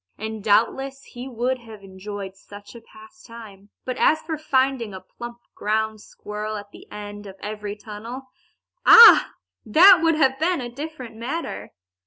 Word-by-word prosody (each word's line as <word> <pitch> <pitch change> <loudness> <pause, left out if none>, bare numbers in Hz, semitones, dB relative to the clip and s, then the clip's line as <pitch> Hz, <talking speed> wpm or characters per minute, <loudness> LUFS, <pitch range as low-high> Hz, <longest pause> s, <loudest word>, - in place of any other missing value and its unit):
And 220 -1 -6
doubtless 270 +6 0
he 245 +2 -10
would 250 +1 -2
have 220 -4 -13
enjoyed 195 0 -8
such 205 +1 -14
a 235 - -12
pastime. 230 - -15 0.2
But 255 - -4
as 310 - +3
for 320 0 -4
finding 265 -7 -1
a - - -7
plump 235 +5 -10 0.2
ground 220 0 -2
squirrel 210 +1 -7
at 205 0 -11
the - - -16
end 205 0 -9
of 190 - -11
every 210 -1 -6
tunnel 220 +5 -9 0.6
ah! 465 0 +9 0.3
that 350 - +7
would 330 -1 +2
have 270 -3 +1
been 350 +1 0
a 245 -2 -5
different 265 -4 -8
matter. 270 +9 -6
230 Hz, 155 wpm, -22 LUFS, 210-270 Hz, 0.6 s, ah